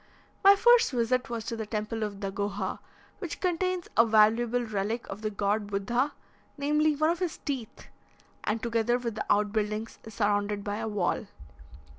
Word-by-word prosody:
My 395 +1 +9
first 480 +3 +5
visit 250 +2 +1
was 230 -2 -4
to 235 - -3
the 220 -1 -5
temple 215 +1 -3
of 205 -2 -4
Dagoha, 200 0 -3 0.4
which 355 -5 -5
contains 365 0 -1
a 230 - +7
valuable 225 +2 +3
relic 215 +2 -2
of 200 +2 -6
the 215 - -1
god 205 +1 -1
Buddha, 235 +8 0 0.4
namely, 300 +2 +2
one 310 +3 +2
of 345 - -3
his 355 -4 -2
teeth, 260 -7 -5 0.6
and, 220 +1 -1
together 235 0 +1
with 240 -2 -3
the 220 - -4
out 205 0 +3
buildings, 215 +1 -2
is 220 -2 -11
surrounded 205 -1 0
by 205 0 -3
a 225 0 -3
wall. 205 0 -1
225 Hz, 170 wpm, -28 LUFS, 210-255 Hz, 0.6 s, My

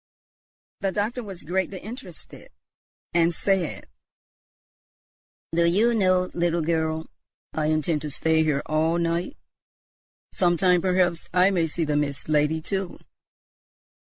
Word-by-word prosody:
The 195 -2 -1
doctor 215 +5 -2
was 195 -7 -9
greatly 190 +4 -2
interested, 215 - -10 0.6
and 170 0 +3
said, 190 -1 -1 1.7
"Do 170 0 +3
you 210 +8 +3
know, 185 -4 +2
little 170 -1 0
girl, 160 0 -1 0.5
I 155 -1 0
intend 155 0 0
to 150 - -4
stay 160 +2 +2
here 150 -3 0
all 160 +2 +1
night, 170 - -1 1.0
sometime; 180 0 +3
perhaps 180 -2 +1
I 180 +2 +5
may 170 -4 +1
see 165 +2 -2
the 150 -1 0
Mist 140 -2 -2
Lady 155 +1 +2
too." 190 +2 -3
170 Hz, 120 wpm, -25 LUFS, 160-185 Hz, 1.7 s, I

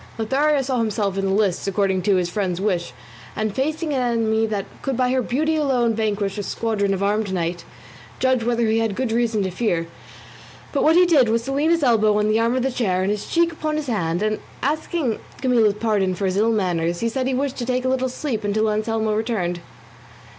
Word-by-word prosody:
Lothario 275 +5 +1
saw 255 -1 -1
himself 210 -3 -1
in 195 0 -1
the 190 - 0
lists 200 -2 +1
according 195 -1 +1
to 200 +1 +2
his 180 -1 +1
friend's 180 -1 -2
wish, 185 -4 -1 0.4
and 215 -1 -2
facing 305 - -1
an 260 - 0
enemy 225 -2 +1
that 205 -3 -2 0.2
could 270 -3 -2
by 250 -1 +2
her 260 0 +2
beauty 305 +7 0
alone 255 -6 +1
vanquish 210 -2 -1
a - - -1
squadron 205 -1 -1
of 195 0 -1
armed 205 0 0
knights; 175 -1 -2 0.5
judge 260 -2 +1
whether 235 0 +1
he 220 +1 +2
had 225 -3 -1
good 255 -1 -1
reason 225 -3 +1
to 190 - -2
fear; 175 -4 -1 0.9
but 280 - 0
what 320 +1 +5
he 360 +1 +6
did 290 -9 +4
was 230 +1 +1
to 270 - -4
lean 290 +4 +1
his 335 -2 +2
elbow 215 -4 +3
on 210 0 +1
the 215 +1 +2
arm 230 +2 +1
of 255 - 0
the 265 - 0
chair, 185 -7 0
and 195 - +1
his 210 -1 -3
cheek 335 0 +2
upon 310 -1 -3
his 305 -1 -2
hand, 175 - -1
and, 215 0 0 0.2
asking 300 -3 -1 0.2
Camilla's 235 -6 +3
pardon 210 -4 0
for 195 - -2
his 185 -1 0
ill 220 +3 +3
manners, 175 -5 0
he 230 - +1
said 255 +3 -1
he 265 - 0
wished 275 0 -2
to 245 - -3
take 255 0 0
a - - +2
little 260 0 0
sleep 250 -4 -3
until 215 +1 +1
Anselmo 220 0 -1
returned. 210 -6 -1
225 Hz, 225 wpm, -22 LUFS, 200-260 Hz, 0.9 s, he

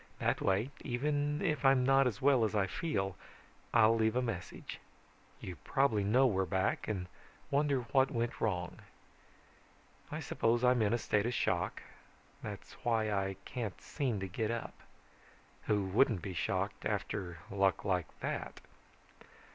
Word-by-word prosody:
That - - 0
way 100 +8 +1
even 145 +4 -1
if 155 -6 0
I'm 135 -2 +5
not 135 0 +5
as 110 -3 -4
well 135 -4 +5
as 110 -1 0
I 100 -2 +3
feel, 95 - -2 0.6
I'll 115 -1 +5
leave 110 0 +2
a 125 - +3
message. 110 -8 -5 0.6
You 90 -3 -7
probably 115 - +1
know 120 +7 +4
we're 95 -6 +2
back 95 +2 0
and 95 -4 -2 0.5
wonder 140 -2 +2
what 130 +2 +2
went 120 -2 -2
wrong. 90 -5 -1 1.3
"I - - -3
suppose 120 +2 +1
I'm 125 -1 +4
in 105 -1 +2
a 120 - +3
state 105 -1 +1
of 120 - -1
shock. - - 0 0.6
That's - - -7
why 110 -2 +1
I 95 -1 0
can't 115 -6 -4
seem 130 -9 -2
to 95 - -2
get 105 +4 -2
up. 115 0 -3 0.9
Who 105 -2 +2
wouldn't 100 -1 +2
be 95 - -4
shocked - - -2
after 90 -3 -2
luck 95 -1 +1
like 90 -5 +1
that? - - -4
115 Hz, 150 wpm, -33 LUFS, 95-130 Hz, 1.3 s, I'm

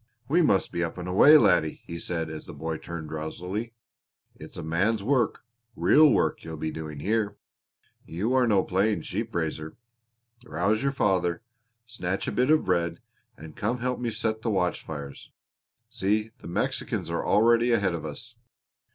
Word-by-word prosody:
"We 170 +5 +3
must 100 - +2
be 85 - -1
up 85 - -4
and 90 0 -5
away, 140 +12 +7
laddie," 95 - +2
he 85 0 -6
said, 85 -2 -3
as 80 - -8
the - - -9
boy 80 0 -3
turned 80 -2 -7
drowsily. 90 +9 -5 0.6
"It's - - -12
a - - -5
man's 95 +7 0
work 130 +2 +1 0.3
real 155 -1 +6
work - - +1
you're 80 -1 -7
doing 80 -1 -5
here; 105 +1 0 0.7
you 100 +10 -1
are 130 -2 +3
no 100 -4 +3
playing 95 -1 0
sheep - - -4
raiser. 80 -1 -3 0.7
Rouse 110 -1 0
your 140 0 +1
father, 95 -5 0 0.4
snatch 95 -5 -3
a - - 0
bit 125 +2 +1
of 155 0 +4
bread, 85 -2 0 0.4
and 80 0 -11
come 110 +4 -1
and 125 - -9
help 125 0 -1
me 120 -1 -1
set 110 0 -2
the 115 - -1
watch 90 -4 0
fires. 70 -3 -8 0.6
See, 105 +3 0
the - - -11
Mexicans 85 - -2
are - - -1
already 115 +2 +4
ahead 100 -6 +2
of 85 - -4
us." 105 +11 -8
95 Hz, 170 wpm, -27 LUFS, 85-115 Hz, 0.7 s, away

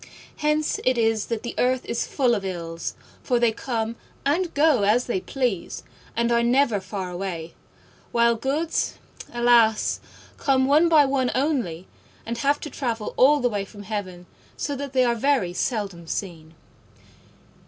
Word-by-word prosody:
Hence 300 0 0
it 255 -1 +2
is 225 -2 +1
that 230 -2 -3
the 240 - -4
earth 255 0 +1
is 235 - -2
full 250 -3 +2
of 205 -4 -1
Ills, 170 -3 -4 0.3
for 250 - +1
they 235 -1 +3
come 230 -1 -3 0.3
and 335 +5 +1
go 295 -5 +4
as 215 +5 +3
they 190 -6 -1
please 245 -9 -2 0.3
and 235 0 +1
are 235 0 +3
never 240 -2 +3
far 190 -1 -5
away; 175 -3 -5 0.6
while 235 0 +4
Goods, 285 +8 -1 0.4
alas! 240 -2 +3 0.4
come 265 -2 +3
one 305 +5 +4
by 305 -3 +6
one 270 -2 +1
only, 245 - -1 0.4
and 235 +1 -4
have 285 +2 +2
to 300 - -5
travel 230 -6 -3
all 285 +2 +5
the 245 - +2
way 205 -3 -2
from 205 +1 -11
heaven, 190 -4 -5 0.3
so 285 - -2
that 280 0 -6
they 260 -1 +4
are 240 -1 +2
very 235 -7 +1
seldom 195 -6 -3
seen. 165 -4 -5
235 Hz, 160 wpm, -24 LUFS, 200-270 Hz, 0.6 s, by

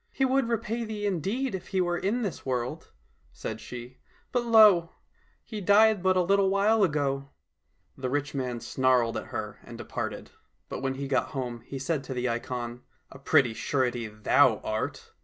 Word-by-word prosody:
" - - -44
He 270 - +1
would 265 -2 +1
repay 230 0 -1
thee 215 -2 -4
indeed 205 - -1
if 190 - -5
he 190 - -1
were 175 -1 +1
in 230 +6 0
this 195 -6 -4
world," 130 +4 -3 0.4
said 110 0 -6
she, 125 +1 -9 0.2
*' - - -35
but 245 -1 +1
lo 220 -5 +7
now! 170 - -20 0.5
he 215 -3 -6
died 205 +1 +5
but 185 0 +3
a 180 - +4
little 195 +1 +3
while 205 +2 +3
ago! 140 -4 0 0.3
" 80 +5 -45
The 130 -1 -2
rich 145 +2 -1
man 125 -4 -3
snarled 125 -3 +2
at - - -4
her - - -5
and - - -10
departed, - - -5 0.4
but - - -4
when 135 0 -1
he 140 +1 -4
got 135 -1 +1
home 120 -3 -4
he 140 - -5
said 140 +1 -2
to 130 - -5
the 125 0 -1
ikon, 120 0 -4 0.2
" - - -41
A 135 - -12
pretty 130 -3 +3
surety 120 -2 -1
thou 110 +3 +3
art 110 0 -3
145 Hz, 195 wpm, -28 LUFS, 125-200 Hz, 0.5 s, lo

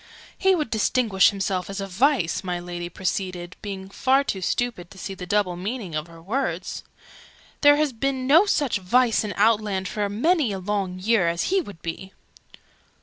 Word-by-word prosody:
"He 385 -1 +3
would 300 -8 -2
distinguish 220 -3 +3
himself 190 -2 -2
as 195 +1 -5
a 195 - -2
Vice!" 200 - +1
my 180 -1 -2
Lady 175 0 -6
proceeded, 185 -1 -3
being 195 -2 -6
far 265 +7 +2
too 195 -8 -3
stupid 205 -3 -2
to - - -15
see 195 +1 -5
the 180 -1 -8
double 200 -2 +1
meaning 195 0 -5
of 155 +1 -3
her 165 -1 -14
words. 240 +11 -3 0.8
"There 290 0 +7
has 295 -2 +1
been 260 +2 -2
no 325 +10 +6
such 285 - +1
Vice 230 +5 +3
in 210 - -3
Outland 205 -3 +2
for 205 0 -2
many 280 - +2
a - - -3
long 190 -1 -2
year, 195 -1 +2
as 170 - -1
he 390 - +4
would 200 - -11
be!" 190 +3 -6
200 Hz, 180 wpm, -24 LUFS, 180-250 Hz, 0.8 s, There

